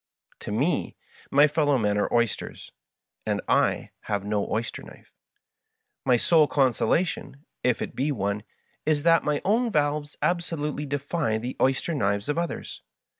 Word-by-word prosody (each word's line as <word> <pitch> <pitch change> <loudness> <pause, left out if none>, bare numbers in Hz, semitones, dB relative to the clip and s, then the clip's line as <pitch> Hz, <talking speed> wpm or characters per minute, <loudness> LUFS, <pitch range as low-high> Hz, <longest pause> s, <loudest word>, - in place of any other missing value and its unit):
To - - -6
me 135 +12 0 0.3
my 145 +2 +6
fellow 145 -2 +2
men 105 -3 +1
are - - 0
oysters, 120 -3 -1 0.5
and - - -1
I - - +2
have 100 -2 -2
no 105 -1 -1
oyster 115 +1 -2
knife; - - -15 0.9
my 125 -2 +4
sole 155 +4 +4
consolation 140 +3 0 0.2
(if 125 -3 +1
it - - -7
be 140 +3 0
one) 100 -4 -1 0.4
is 150 -1 +1
that 165 0 +5
my 150 -1 -1
own 230 +4 +2
valves 145 -2 0
absolutely 150 -4 -1
defy 145 -3 -1
the 120 +3 -5
oys 130 0 +2
ter 170 - -1
knives 100 -6 0
of 150 +3 +1
others. 170 -1 -4
145 Hz, 150 wpm, -26 LUFS, 115-155 Hz, 0.9 s, my